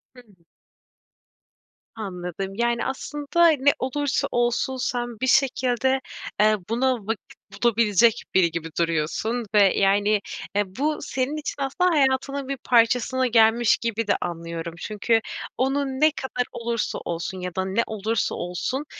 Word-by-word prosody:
Hımm. 230 -6 -18 1.6
Anladım. 190 -2 -5
Yani, 235 +1 0
aslında 295 +5 +1
ne 285 -2 +3
olursa 280 +2 -1
olsun 240 +2 0
sen 240 -2 -3
bir 260 - -1
şekilde, 260 0 +2 0.4
eee, 215 +1 +5
buna 255 +3 +2
vakit 225 -3 -5 0.3
bulabilecek 230 0 +3
biri 175 -3 +4
gibi 165 0 -4
duruyorsun 170 +9 -1
ve, 200 -2 +6
yani, 205 +1 +3 0.3
eee, 205 - +3
bu 300 +3 0
senin 265 +3 -2
için 300 -1 -5
aslında 280 +7 +1
hayatının 275 -2 +1
bir 275 0 -3
parçasına 250 +1 +2
gelmiş 230 0 +4
gibi 230 -1 -2
de - - +3
anlıyorum. 170 -1 -5
Çünkü 225 +2 0 0.4
onu 270 +3 +1
ne 275 +3 +2
kadar 265 -4 -3
olursa 235 -1 -2
olsun 170 +3 -4
ya 180 -1 -5
da 190 0 -1
ne 195 +5 +1
olursa 220 0 -1
olsun, 180 +11 -3
235 Hz, 135 wpm, -24 LUFS, 200-265 Hz, 1.6 s, ve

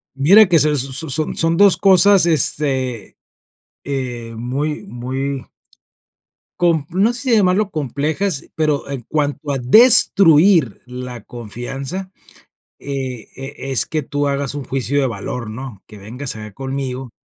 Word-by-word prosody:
Mira 190 +10 +6
que 170 -3 +4
se 150 +1 +2
son 135 +3 -2
son 155 +3 -2
son 165 0 +1
2 200 -1 +5
cosas, 195 0 +5
este, 130 - 0 0.7
eh, 125 -4 -4
muy 140 - -3
muy 135 0 -4 1.2
compl 170 +1 0
no 225 +4 +3
sé, 240 - -3
si 230 - +5
llamarlo 195 0 +2
complejas, 150 - -2
pero, 150 -3 -1
en 140 -3 -4
cuanto 145 -1 -2
a 140 - -1
destruir 170 - +5
la 125 -2 -8
confianza, 135 - -6 0.7
eh, 130 -4 -6
eh, 135 +2 -7 0.2
es 135 - +1
que 155 -1 -2
tú 145 +1 -2
hagas 140 -1 -2
un 145 -2 -5
juicio 135 +2 -1
de 135 - +1
valor, 115 +1 -5
¿no?, 115 -3 -9
que 105 -2 -13
vengas 125 +7 -6
acá 105 -1 -9
conmigo, 135 -1 -5
140 Hz, 140 wpm, -18 LUFS, 125-160 Hz, 1.2 s, Mira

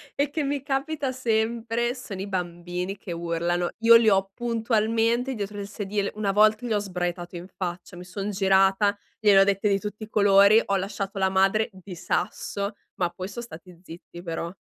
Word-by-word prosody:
e 285 0 +1
che 300 0 -2
mi 280 -1 -1
capita 275 0 -2
sempre 235 0 -1
sono 200 -6 -7
i 200 - -4
bambini 180 +1 -4
che 190 - -9
urlano, 170 +1 -1
io 230 0 +7
li 230 -1 +6
ho 195 -1 +2
puntualmente 230 +1 0
dietro 205 0 -5
il 200 - -5
sedile, 205 -1 -3
una 205 -2 0
volta 215 +3 +4
gli 225 - -1
ho 205 - +2
sbraitato 175 -2 -4
in 175 +2 -7
faccia, 180 -1 -5
mi 180 - -8
son 195 +3 -5
girata, 195 +1 +3 0.2
gliene 205 -3 +6
ho - - +8
dette 200 +1 +1
di 195 0 +2
tutti 210 +1 -6
i 215 - -9
colori, 200 +1 +6
ho 200 - -1
lasciato 195 +1 -3
la 190 0 +2
madre 195 +3 +2
di 185 -1 -10
sasso, 200 +4 -3 0.2
ma 175 -2 0
poi 185 +2 -7
son 235 +4 -7
stati 180 -4 -12
zitti 175 0 -11
però. 170 0 -4
200 Hz, 190 wpm, -25 LUFS, 185-225 Hz, 0.2 s, ho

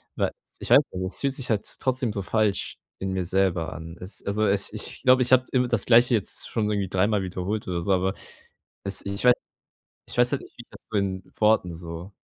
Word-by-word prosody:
weil - - 0 0.3
ich - - -5
weiß - - +9
nicht, 95 - -3
es 95 - -4
fühlt 140 -1 -1
sich 130 -2 -4
halt 105 -3 0
trotzdem 130 -4 0
so 100 - -3
falsch 105 0 0 0.2
in 95 0 -3
mir 95 -1 -1
selber 90 -3 0
an. 80 +2 -9
Es 90 +2 -7
also, 105 +2 +1
es 100 0 0
ich - - -2
glaube, 130 0 +6
ich 125 - +1
habe 130 0 +6
immer 125 -1 +2
das 120 -4 +1
Gleiche 120 +1 +6
jetzt 105 - -2
schon 110 -3 -1
irgendwie 100 -2 -1
dreimal 100 +2 +1
wiederholt 95 +3 -3
oder 85 -2 -2
so, 100 - -1
aber 95 +1 +1 0.7
es 100 -1 0
ich 100 0 -3
wei 125 - +9 0.7
ich - - -7
weiß 120 0 +4
halt 140 - -1
nicht, - - -10
wie 120 - -9
ich - - -36
das - - -10
so 110 - 0
in 95 -1 -1
Worten 105 -5 +3
so. 85 +2 -8
100 Hz, 230 wpm, -25 LUFS, 95-115 Hz, 0.7 s, weiß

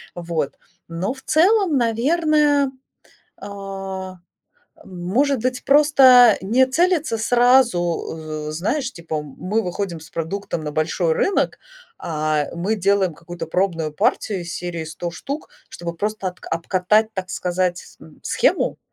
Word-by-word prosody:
Вот. 170 -4 -3 0.3
Но, 170 +6 -3
в 265 - -14
целом, 365 -1 +3
наверное, 285 +4 +2 0.7
а, 195 -2 -6 0.7
может 220 +10 0
быть, 255 -1 -1
просто 265 -5 +7
не 240 +7 +3
целиться 315 -4 +1
сразу, 175 -11 +1
э, - - -3
з - - -6
знаешь, 255 - -1
типа, 160 -3 -4
мы 185 +10 -3
выходим 180 -1 -3
с 160 - -13
продуктом 165 0 -4
на 150 - -3
большой 160 +2 0
рынок, 390 - 0 0.4
а, 155 -2 -1
мы 190 +6 -1
делаем 195 -2 +2
какую-то 170 +2 -8
пробную 165 -3 -1
партию 190 +5 0
из 170 -1 -6
серии 170 -2 -4
100 165 +2 -5
штук, 280 - -6 0.2
чтобы 170 -1 -6
просто 210 +1 -3
отка 180 - -11
обкатать, 190 +6 +1
так 185 -1 -5
сказать, 180 0 -2
м, - - -16
схему, - - +1
190 Hz, 130 wpm, -21 LUFS, 170-250 Hz, 0.7 s, просто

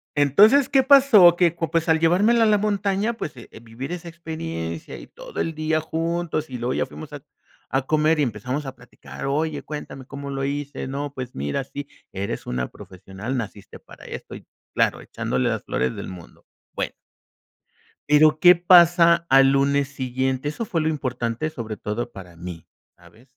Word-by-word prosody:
Entonces, 205 - +5
¿qué 270 -1 +4
pasó? 255 -11 +7
Que, 175 -2 +2
co 165 -2 -3
pues, 165 0 0
al 160 0 +4
llevármela 205 +8 +4
a - - +4
la 210 -1 +4
montaña, 200 +1 0
pues, 155 - -6
eh, 120 - -12
vivir 120 +6 -8
esa 175 -1 -7
experiencia 85 - -6
y - - -11
todo - - -10
el 165 - -1
día 155 0 0
juntos 165 -1 -2
y 125 - -5
luego 120 +2 -2
ya - - 0
fuimos 155 -1 -11
a 145 - -7 0.5
a 135 - +1
comer 155 +1 +2
y 145 - +3
empezamos 125 +5 -3
a 135 - -7
platicar: 125 +2 -11
"Oye, 155 +3 -1
cuéntame, 140 -3 -8
¿cómo 140 0 -8
lo 135 0 -2
hice?" 145 -1 -4
"No, 140 +2 -4
pues 125 -2 -7
mira, 70 - -2
sí, 145 +1 -7 0.3
eres 100 +1 -4
una 60 0 -2
profesional, 95 +7 -8
naciste 105 -3 -7
para - - -16
esto", - - -8
y - - -12 0.3
claro, - - +1
echándole 65 0 -2
las - - -3
flores 65 -1 -1
del - - -6
mundo. 90 -3 -12 0.3
Bueno - - -3 1.2
pero 155 +1 +5
¿qué 180 -1 +8
pasa 170 -1 +5
al 135 0 +6
lunes 140 0 +2
siguiente? 130 0 -2
Eso 155 +10 -4
fue 170 -6 -2
lo 155 - +1
importante, 125 -1 -2
sobre 110 -8 -6
todo 115 +3 -4
para 90 -5 -12
mí, 85 -1 -9 0.3
¿sabes? 90 +8 -20
145 Hz, 180 wpm, -23 LUFS, 120-170 Hz, 1.2 s, qué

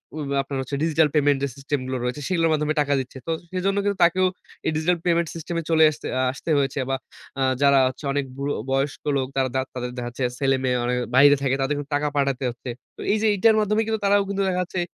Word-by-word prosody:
ঐ - - -5 0.2
আপনার 135 0 -5 0.3
digital 160 -1 +3
payment 145 -2 +3
system 140 +1 -2
গুলো 130 0 -2
রয়েছে 125 +4 -3
সেগুলোর 165 -3 +2
মাধ্যমে 150 0 0
টাকা 145 -1 +1
দিচ্ছে। 130 0 -6
তো - - 0 0.2
সেজন্য 190 +2 0
কিন্তু 200 -1 0
তাকেও 185 +2 +4 0.4
এই - - +2
ডিজিটাল 165 +3 +1
পেমেন্ট 170 -1 +2
সিস্টেম 165 +1 -5
এ - - -11
চলে 160 -1 +5
এসতে 150 - -8
আ - - +2
আসতে 140 +5 -8
হয়েছে 140 0 -1
বা 135 - +1 0.4
আ - - 0 0.2
যারা 140 -1 +5
হচ্ছে 130 - -6
অনেক 145 -1 0
বুড়ো 140 +1 -2 0.2
বয়স্ক 135 +2 -1 0.2
লোক 130 -1 -1
তারা 135 -1 +1
দাঁত 130 0 0
তাদের 125 -1 -4
দেখা 120 -1 -3
যাচ্ছে 120 +2 -5 0.2
ছেলে-মেয়ে 130 -2 +1
অনেকে 125 0 0
বাহিরে 145 +2 +7
থাকে, 135 -1 +2
তাদেরকে 145 +2 -1
টাকা 145 +1 0
পাঠাতে 140 -2 0
হচ্ছে। 120 +1 -8 0.4
এই 210 - +3
যে, 220 - +3
এটার 220 +3 +4
মাধ্যমে 210 +1 +1
কিন্তু 220 0 -1
তারাও 200 0 +4
কিন্তু 200 0 -1
দেখা 180 -1 0
যাচ্ছে 180 +1 -5
145 Hz, 220 wpm, -23 LUFS, 135-170 Hz, 0.4 s, বাহিরে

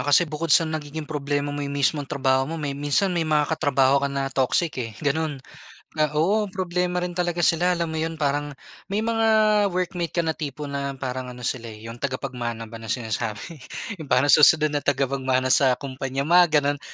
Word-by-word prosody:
kasi 145 +4 +4
bukod 160 +1 -4
sa 165 +2 +6
nagiging 155 -1 -5
problema 145 -1 -2
mo 145 - -4
yung 140 0 -3
mismong 140 0 +1
trabaho 130 0 +1
mo, 165 - -4
may 145 -3 -3
minsan 145 +7 +1
may 175 - 0
mga 155 -2 +2
katrabaho 140 -3 +2
ka 140 - 0
na 135 -1 -3
toxic 140 +5 +1
eh, 115 -2 -4
ganun. 150 +1 0 0.6
Na 155 -1 +1
oo, 205 +7 +2
problema 180 -1 -2
rin 180 - -3
talaga 175 -1 -1
sila, 175 +2 +3
alam 170 -2 -2
mo 160 - -3
yun? 165 +1 -2
Parang 145 -1 -1 0.3
may 205 +2 -1
mga 225 0 +1 0.4
workmate 180 -2 -3
ka 170 - +2
na 160 - 0
tipo 150 -2 -6
na 140 -1 -4
parang 130 -1 -4
ano 125 0 -9
sila, 120 0 -2
eh, 110 -1 -10
yung 120 - -11
tagapagmana 125 -4 -4
ba 115 0 -10
na 115 - -9
sinasabi. 115 - -4 0.4
Yung 155 - -8
parang 130 +3 +3
susunod 155 0 +6
na 145 - 0
tagapagmana 130 -2 0
sa 130 -2 +4
kumpanya, 135 +1 -4
mga 160 -2 +4
ganon. 145 0 0
145 Hz, 195 wpm, -24 LUFS, 135-165 Hz, 0.6 s, sa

